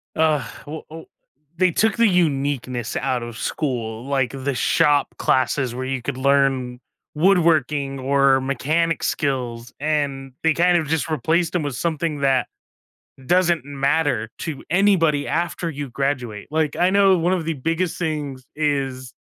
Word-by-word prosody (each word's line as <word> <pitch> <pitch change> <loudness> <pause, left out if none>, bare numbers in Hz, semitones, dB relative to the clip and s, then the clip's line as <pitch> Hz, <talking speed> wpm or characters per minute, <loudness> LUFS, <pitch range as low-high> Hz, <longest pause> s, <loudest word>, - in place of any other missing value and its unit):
ugh, 155 -7 +1 0.2
w 155 +2 -6
w 160 +1 -10 0.5
they 185 -1 +3
took 220 +4 +2
the 230 -1 +4
uniqueness 140 - 0
out 125 -2 -1
of 120 0 -8
school, 120 -5 -3
like 135 -3 0
the 135 0 -3
shop 145 +2 +2
classes 130 -1 +1
where 130 +1 -4
you 130 -1 -2
could 130 +1 -4
learn 130 -2 +1 0.3
woodworking 150 -5 +2
or 135 0 +3
mechanic 155 +5 0
skills, 125 -4 -2
and 140 -3 -2
they 160 -1 +4
kind 175 +1 +3
of 160 - -1
just 160 -1 0
replaced 160 +4 0
them 175 - 0
with 145 -3 -3
something 160 -2 -2
that 135 -2 +2 0.8
doesn't 175 -6 +2
matter 140 -5 0
to 155 -4 -5
anybody 170 -7 +3
after 170 0 -1
you 145 -4 -6
graduate. 125 -6 -3
Like, 155 -1 0
I 180 +1 +3
know 195 -2 +4
one 175 +3 +1
of 170 -4 -1
the 165 - -1
biggest 165 +6 -2
things 145 -6 -3
is 135 -4 -2
145 Hz, 150 wpm, -22 LUFS, 130-165 Hz, 0.8 s, the